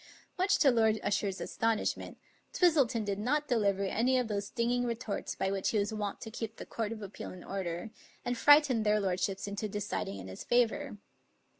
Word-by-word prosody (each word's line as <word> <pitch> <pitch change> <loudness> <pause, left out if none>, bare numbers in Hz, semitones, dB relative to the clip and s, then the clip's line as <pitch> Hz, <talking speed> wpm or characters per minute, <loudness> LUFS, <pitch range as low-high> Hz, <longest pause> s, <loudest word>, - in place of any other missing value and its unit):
Much 385 +2 +3
to 275 - +5
Lord 220 -2 +3
Usher's 200 -1 0
astonishment, 225 -1 -1 0.4
Twistleton 275 - +3
did 200 -1 -2
not 295 +7 0
deliver 200 -6 +1
any 235 +6 +2
of 250 -2 +1
those 200 -2 -2
stinging 240 +2 0
retorts 230 -3 -3
by 190 - -1
which 195 -1 0
he 220 - +1
was 210 +2 0
wont 205 -2 -3
to 220 - -7
keep 225 0 -5
the - - -8
Court 225 -2 -3
of 220 -2 -6
Appeal 195 0 -7
in 180 - -10
order, 190 +1 -4 0.3
and 245 - 0
frighten 290 -2 +6
their 210 0 +3
lordships 190 0 -1
into 205 +1 -3
deciding 200 - -3
in 95 -1 -8
his 95 - -8
favor. 245 +1 +1
220 Hz, 185 wpm, -31 LUFS, 200-245 Hz, 0.4 s, frighten